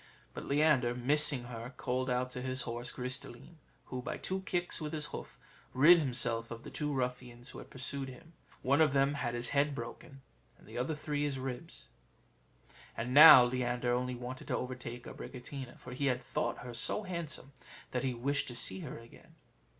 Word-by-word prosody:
But -, -, -7 dB
Leander, 140 Hz, -4 st, +3 dB
missing 140 Hz, +1 st, +3 dB
her, 120 Hz, +1 st, -8 dB
called 130 Hz, 0 st, -1 dB
out 125 Hz, 0 st, 0 dB
to 125 Hz, -, -5 dB
his 130 Hz, 0 st, -2 dB
horse 120 Hz, +1 st, -4 dB
Gris 125 Hz, +1 st, -3 dB
de -, -, -11 dB
line; 145 Hz, +7 st, -14 dB, 0.3 s
who, 130 Hz, -1 st, -5 dB
by -, -, -4 dB
two 190 Hz, 0 st, -3 dB
kicks 175 Hz, -2 st, -1 dB
with 155 Hz, 0 st, -4 dB
his 150 Hz, -1 st, -2 dB
hoof, -, -, -7 dB, 0.4 s
rid 165 Hz, +7 st, +8 dB
himself 120 Hz, -5 st, +2 dB
of 115 Hz, 0 st, -8 dB
the 145 Hz, -, -9 dB
two 150 Hz, +2 st, -2 dB
ruffians 125 Hz, -2 st, -3 dB
who -, -, -9 dB
had -, -, -11 dB
pursued 135 Hz, +1 st, -4 dB
him: 165 Hz, +6 st, -13 dB, 0.3 s
one 140 Hz, +4 st, +3 dB
of 150 Hz, -3 st, +4 dB
them 140 Hz, +1 st, +3 dB
had 125 Hz, -4 st, -2 dB
his 120 Hz, 0 st, 0 dB
head 145 Hz, 0 st, +2 dB
broken; 135 Hz, +2 st, -8 dB, 0.3 s
and -, -, -20 dB
the -, -, -11 dB
other, 130 Hz, +6 st, -1 dB
three 150 Hz, -1 st, -3 dB
of -, -, +2 dB
his 140 Hz, -2 st, -2 dB
ribs. 130 Hz, +5 st, -6 dB, 1.1 s
And 120 Hz, +3 st, -2 dB
now 145 Hz, -3 st, +11 dB
Leander 120 Hz, 0 st, 0 dB
only 125 Hz, 0 st, -1 dB
wanted 125 Hz, +1 st, -7 dB
to -, -, 0 dB
overtake 125 Hz, -1 st, -6 dB
Abricotina; 130 Hz, 0 st, -8 dB
for 125 Hz, -, -10 dB
he 140 Hz, +2 st, -1 dB
had 125 Hz, -1 st, 0 dB
thought -, -, -2 dB
her 120 Hz, -, -6 dB
so 120 Hz, -, +1 dB
handsome 170 Hz, -7 st, -5 dB, 0.4 s
that 125 Hz, -, -1 dB
he 130 Hz, -2 st, -1 dB
wished 140 Hz, +4 st, -1 dB
to 120 Hz, -, -5 dB
see 95 Hz, -5 st, -1 dB
her -, -, -6 dB
again. 115 Hz, 0 st, -16 dB
130 Hz, 195 wpm, -33 LUFS, 125-145 Hz, 1.1 s, now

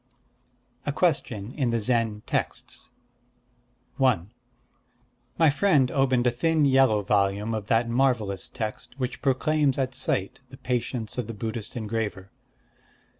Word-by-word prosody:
_ -, -, -45 dB, 0.8 s
A 145 Hz, -, -1 dB
Question 130 Hz, -, -1 dB
in 130 Hz, -5 st, 0 dB
the 115 Hz, 0 st, +1 dB
Zen 110 Hz, -2 st, 0 dB
Texts -, -, -3 dB, 1.1 s
I 130 Hz, -9 st, +4 dB, 1.2 s
My 160 Hz, -3 st, +5 dB
friend 145 Hz, -5 st, +3 dB
opened 130 Hz, -3 st, +2 dB
a 125 Hz, -, +4 dB
thin 155 Hz, +5 st, +2 dB
yellow 130 Hz, -6 st, +4 dB
volume 100 Hz, +2 st, +1 dB
of 105 Hz, -2 st, -4 dB
that 115 Hz, +1 st, +2 dB
marvellous 115 Hz, -6 st, +1 dB
text 110 Hz, +2 st, -6 dB
which 125 Hz, -2 st, -4 dB
proclaims 140 Hz, +1 st, +2 dB
at 130 Hz, -1 st, -1 dB
sight 110 Hz, -6 st, -1 dB
the 130 Hz, -, -12 dB
patience 125 Hz, -2 st, -3 dB
of 120 Hz, -, -3 dB
the 115 Hz, -, -6 dB
Buddhist 110 Hz, +2 st, -4 dB
engraver. 105 Hz, -4 st, -3 dB
120 Hz, 130 wpm, -26 LUFS, 110-135 Hz, 1.2 s, My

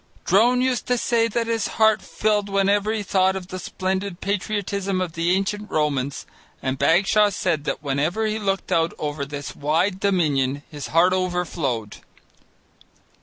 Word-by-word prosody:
Drone 240 Hz, +7 st, +4 dB
used 255 Hz, -2 st, 0 dB
to 250 Hz, -, +2 dB
say 230 Hz, -1 st, +2 dB
that 230 Hz, +1 st, -1 dB
his 225 Hz, -2 st, -1 dB
heart 220 Hz, -1 st, +4 dB
filled 210 Hz, -1 st, 0 dB
whenever 200 Hz, +1 st, +2 dB
he 220 Hz, -2 st, -2 dB
thought 190 Hz, -1 st, +2 dB
of 185 Hz, -1 st, -6 dB
the 185 Hz, -, -5 dB
splendid 190 Hz, 0 st, -3 dB
patriotism 200 Hz, -1 st, -2 dB
of 180 Hz, -3 st, -3 dB
the 170 Hz, +1 st, -1 dB
ancient 205 Hz, +2 st, -2 dB
Romans, 140 Hz, -3 st, -1 dB, 0.3 s
and 130 Hz, 0 st, -3 dB
Bagshaw 195 Hz, +8 st, +4 dB
said 175 Hz, -6 st, -1 dB
that 155 Hz, -, -3 dB
whenever 150 Hz, +10 st, 0 dB
he 215 Hz, 0 st, -1 dB
looked 195 Hz, -2 st, -2 dB
out 165 Hz, 0 st, +1 dB
over 145 Hz, -1 st, -3 dB
this 145 Hz, 0 st, -6 dB
wide 165 Hz, +7 st, 0 dB
Dominion 145 Hz, -8 st, +1 dB
his 145 Hz, -2 st, -6 dB
heart 175 Hz, +3 st, +4 dB
overflowed. 175 Hz, -, -2 dB
185 Hz, 155 wpm, -23 LUFS, 155-205 Hz, 0.3 s, Drone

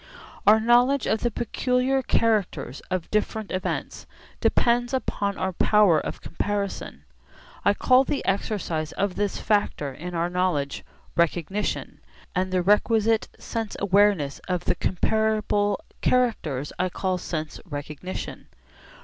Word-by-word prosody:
Our 215 Hz, +1 st, +8 dB
knowledge 245 Hz, +4 st, +4 dB
of 220 Hz, -, +1 dB
the 240 Hz, -, 0 dB
peculiar 250 Hz, +3 st, 0 dB
characters 200 Hz, -, 0 dB
of 185 Hz, -2 st, -3 dB
different 215 Hz, 0 st, -1 dB
events 185 Hz, -, -3 dB, 0.3 s
depends 240 Hz, +2 st, +2 dB
upon 200 Hz, -6 st, -2 dB
our 190 Hz, 0 st, -1 dB
power 200 Hz, -3 st, +4 dB
of -, -, -6 dB
comparison. 200 Hz, +2 st, -3 dB, 0.6 s
I 200 Hz, -, +4 dB
call 255 Hz, +4 st, +5 dB
the 280 Hz, -, -2 dB
exercise 180 Hz, -6 st, -1 dB
of 200 Hz, -1 st, -1 dB
this 205 Hz, 0 st, -1 dB
factor 205 Hz, -9 st, 0 dB
in 175 Hz, +6 st, -7 dB
our 170 Hz, +1 st, +1 dB
knowledge 175 Hz, -6 st, -1 dB, 0.3 s
'recognition,' 170 Hz, +4 st, -1 dB, 0.3 s
and 185 Hz, 0 st, 0 dB
the 185 Hz, -1 st, +1 dB
requisite 220 Hz, +3 st, +3 dB
sense 225 Hz, -2 st, -4 dB
awareness 200 Hz, -7 st, +3 dB
of 180 Hz, -2 st, -1 dB
the -, -, +2 dB
comparable 210 Hz, +1 st, +1 dB, 0.2 s
characters 165 Hz, -, +1 dB
I 185 Hz, 0 st, +1 dB
call 185 Hz, 0 st, -1 dB
'sense 155 Hz, -3 st, -4 dB
recognition.' 150 Hz, +3 st, -6 dB
200 Hz, 125 wpm, -25 LUFS, 175-220 Hz, 0.6 s, Our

